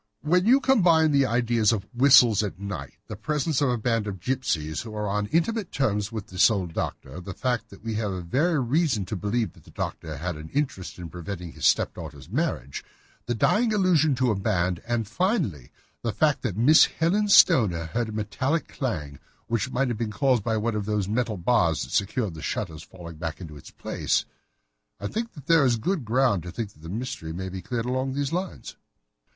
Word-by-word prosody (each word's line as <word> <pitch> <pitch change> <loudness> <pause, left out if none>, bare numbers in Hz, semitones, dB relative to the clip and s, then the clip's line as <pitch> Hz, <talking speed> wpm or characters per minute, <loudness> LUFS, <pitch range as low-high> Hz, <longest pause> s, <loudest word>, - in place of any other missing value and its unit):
"When 180 +5 +2
you 260 +4 +6
combine 175 - +4
the 140 -2 +3
ideas 120 -2 +2
of 105 -4 -2
whistles 125 -4 +6
at 105 -4 -4
night, 100 -9 -6
the 105 - -7
presence 150 +6 -1
of 140 - +3
a 125 - +1
band 115 -1 0
of 95 -2 -5
gipsies 85 - -1
who 110 -2 -8
are 105 0 -2
on 105 +1 -1
intimate 175 - 0
terms 105 -6 0
with 110 -3 -5
this 90 +4 +4
old 95 -6 -2
doctor, 75 +3 -5
the 95 +1 -7
fact 125 -2 -2
that 100 - -15
we 115 -1 -3
have 105 -2 -2 0.2
every 160 +3 +2
reason 125 - +1
to 105 - -4
believe 105 +4 -1
that - - -19
the - - -17
doctor 80 -3 -5
has 85 +3 -3
an 75 +1 -9
interest 135 -10 -2
in 85 -3 -8
preventing 90 0 -6
his - - 0
stepdaughter's 75 +4 -1
marriage, 110 - -2 0.4
the 120 - 0
dying 220 - +2
allusion 165 -7 +3
to 125 -1 +2
a - - 0
band, 90 -3 0
and, 120 -3 -1
finally, 165 - -1 0.3
the 115 - -1
fact 145 +8 +1
that 105 -7 -3
Miss 145 +8 +7
Helen 195 +6 0
Stoner 110 - +5
heard 115 +7 -2
a - - -5
metallic 130 +9 -1
clang, 75 - -4 0.3
which 115 +2 -1
might 130 0 0
have 115 -2 -3
been 115 -2 -1
caused 130 -3 +2
by 110 0 0
one 115 +2 -1
of 105 -2 -2
those 105 -3 0
metal 110 0 -1
bars 85 -4 +2
that 65 - -9
secured 100 0 0
the 80 - -9
shutters 80 +2 -4
falling 85 0 -11
back 80 0 -5
into 80 -5 -9
its 75 - -12
place, - - -1 0.7
I 100 - -6
think 230 - -3
that 145 -6 -12
there 165 -2 +5
is 125 -3 +3
good 140 - -2
ground 120 -4 +2
to 90 +2 -8
think 100 +2 -5
that 75 - -22
the 80 - -9
mystery 105 -6 -5
may 95 +2 -5
be 95 0 -6
cleared 120 +1 -3
along 130 +1 -1
those 140 +1 -2
lines." 180 +2 -4
115 Hz, 205 wpm, -25 LUFS, 95-135 Hz, 0.7 s, Miss